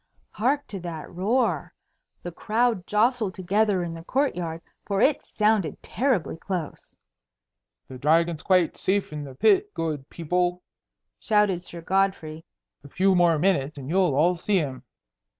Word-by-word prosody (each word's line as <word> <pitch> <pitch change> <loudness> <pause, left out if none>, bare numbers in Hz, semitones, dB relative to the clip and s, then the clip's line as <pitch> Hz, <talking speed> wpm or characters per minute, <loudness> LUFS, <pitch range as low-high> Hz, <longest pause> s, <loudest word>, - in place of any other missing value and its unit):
Hark 275 +6 0
to 195 - -5
that 170 -3 -7
roar! 195 - 0 0.5
The 175 - -5
crowd 220 0 0
jostled 215 -2 +1
together 195 0 +1
in 170 -1 -4
the 165 0 -9
court 275 +9 0
yard, 165 -2 -5 0.2
for 200 -1 -2
it 280 +6 +3
sounded 210 -8 0
terribly 240 - -1
close. 175 -2 -6 0.9
"The 130 -1 -10
Dragon's 165 +3 +2
quite 185 -4 +2
safe 195 -4 0
in 150 -1 -5
the 135 -2 -10
pit, 405 - +3
good 150 -4 -3
people," 180 +2 -1 0.6
shouted 210 -5 +2
Sir 170 -1 -8
Godfrey. 175 -4 -1 0.4
"A 140 - -12
few 190 +6 +2
more 175 -3 +4
minutes 155 -4 +1
and 135 +2 -6
you'll 180 -6 +2
all 165 +5 +4
see 190 +3 0
him." 135 -7 -2
180 Hz, 150 wpm, -25 LUFS, 165-210 Hz, 0.9 s, more